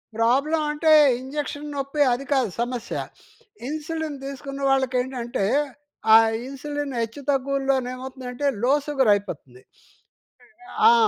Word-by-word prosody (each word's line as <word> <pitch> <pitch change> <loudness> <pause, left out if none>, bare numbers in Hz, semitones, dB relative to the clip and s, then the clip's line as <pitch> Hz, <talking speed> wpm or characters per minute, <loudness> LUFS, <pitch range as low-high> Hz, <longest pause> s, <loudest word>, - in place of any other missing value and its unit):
Problem 275 +8 +2
అంటే 310 +1 +2 0.3
injection 290 +2 -5
నొప్పి 275 +2 -2
అది 260 +3 -4
కాదు 255 -6 +2
సమస్య. 240 -1 -3 0.7
ఇన్సులిన్ 310 0 -4
తీసుకున్న 275 0 -6
వాళ్ళకి 265 -1 +1
ఏంటంటే, 250 -4 -3 0.7
ఆ - - +12 0.3
ఇన్సులిన్ 290 0 -5
హెచ్చు 230 +5 -4
తగ్గువులో 275 0 +1 0.2
ఏమవుతుందంటే 255 +1 -5 0.2
లో 260 +3 +4
సుగర్ 265 -7 +3
అయిపోతుంది. 150 -11 -5 1.3
ఆ! - - +6
270 Hz, 110 wpm, -24 LUFS, 250-290 Hz, 1.3 s, ఆ